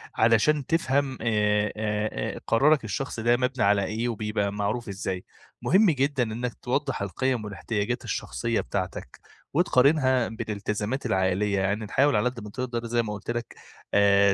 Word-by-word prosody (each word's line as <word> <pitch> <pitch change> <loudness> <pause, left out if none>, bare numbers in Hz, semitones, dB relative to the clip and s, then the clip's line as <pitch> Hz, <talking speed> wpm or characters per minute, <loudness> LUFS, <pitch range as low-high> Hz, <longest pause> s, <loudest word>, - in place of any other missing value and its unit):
علشان 115 +6 +3
تفهم 140 -5 +1
آآ 105 -2 +2
آآ 105 - -2
قرارك 140 +5 +4
الشخصي 110 +3 -4
ده 120 +1 +4
مبنى 130 +1 0
على 100 0 +3
إيه 115 +4 -2
وبيبقى 105 -2 -1
معروف 105 +3 -2
إزاي، 95 -2 -4 0.4
مهم 195 +4 +4
جدًا 140 -2 +1
إنك 120 +2 -3
توضّح 135 0 -1
القيَم 110 +5 -1
والإحتياجات 105 +4 -3
الشخصية 115 -1 -2
بتاعتك، 95 -2 -5 0.3
وتقارنها 135 -4 +3
بالإلتزامات 110 +2 -3
العائلية 95 +2 +1
يعني 100 +3 0
نحاول 140 +7 +2
على 105 +4 +2
قد 125 -1 -9
ما 105 - -8
تقدر 120 0 -4
زي 120 0 +1
ما 105 -2 -4
قُلت 105 +3 -5
لك، 120 0 -5 0.4
آآ 100 -1 +5
115 Hz, 145 wpm, -26 LUFS, 105-130 Hz, 0.4 s, آآ